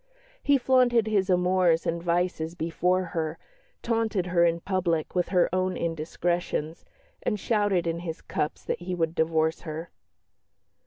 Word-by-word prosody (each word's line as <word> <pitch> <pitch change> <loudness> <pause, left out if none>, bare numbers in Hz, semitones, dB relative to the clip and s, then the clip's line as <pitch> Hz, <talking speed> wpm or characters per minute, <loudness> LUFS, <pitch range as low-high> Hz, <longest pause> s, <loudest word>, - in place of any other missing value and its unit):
He 285 0 +4
flaunted 245 -3 +3
his 205 -3 +1
amours 180 -2 +3
and 170 0 -1
vices 170 -1 -1
before 175 +2 0
her, 160 -1 -2 0.5
taunted 225 -5 0
her 175 -1 +2
in 170 0 +2
public 175 -5 -1
with 180 -1 +1
her 180 -1 +3
own 185 -1 0
indiscretions, 165 0 -2 0.4
and 210 - -1
shouted 205 -5 +1
in 165 0 -1
his 165 -2 -5
cups 150 - -3
that - - -2
he 180 +1 -3
would 165 -2 0
divorce 160 0 +1
her. 160 0 -6
175 Hz, 145 wpm, -27 LUFS, 165-185 Hz, 0.5 s, He